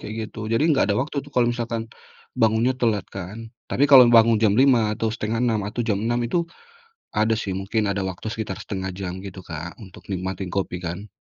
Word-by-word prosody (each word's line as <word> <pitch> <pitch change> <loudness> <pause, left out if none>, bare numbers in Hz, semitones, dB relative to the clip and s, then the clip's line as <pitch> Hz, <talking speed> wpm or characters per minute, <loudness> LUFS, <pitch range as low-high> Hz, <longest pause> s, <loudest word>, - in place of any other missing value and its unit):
kayak 110 +1 -5
gitu. 110 -1 -6
Jadi 115 +7 +2
nggak 140 - +3
ada 100 - +1
waktu 145 +2 -3
tuh - - -13
kalau 120 -2 +3
misalkan 115 -1 -4 0.5
bangunnya 115 +3 +3
telat 110 -6 +1
kan. 105 +5 -7 0.2
Tapi 140 - +2
kalau 130 -3 +10
bangun 115 -1 +6
jam 100 -2 +4
5.00 125 -5 +4
atau 115 - -1
5.30 115 0 0
atau 115 - -4
jam 105 -4 +1
6.00 120 +2 0
itu 170 +8 0 0.7
ada 110 +1 +2
sih 100 - -3
mungkin 105 +3 -1
ada 100 - -2
waktu 95 +3 -6
sekitar 110 -1 -4
1/2 95 -2 -4
jam 95 -1 -5
gitu, 95 -1 -8
Kak, 85 +1 -7
untuk 95 -3 -13
nikmatin 95 0 -3
kopi 95 -2 -2
kan. 90 +5 -5
110 Hz, 200 wpm, -23 LUFS, 95-115 Hz, 0.7 s, kalau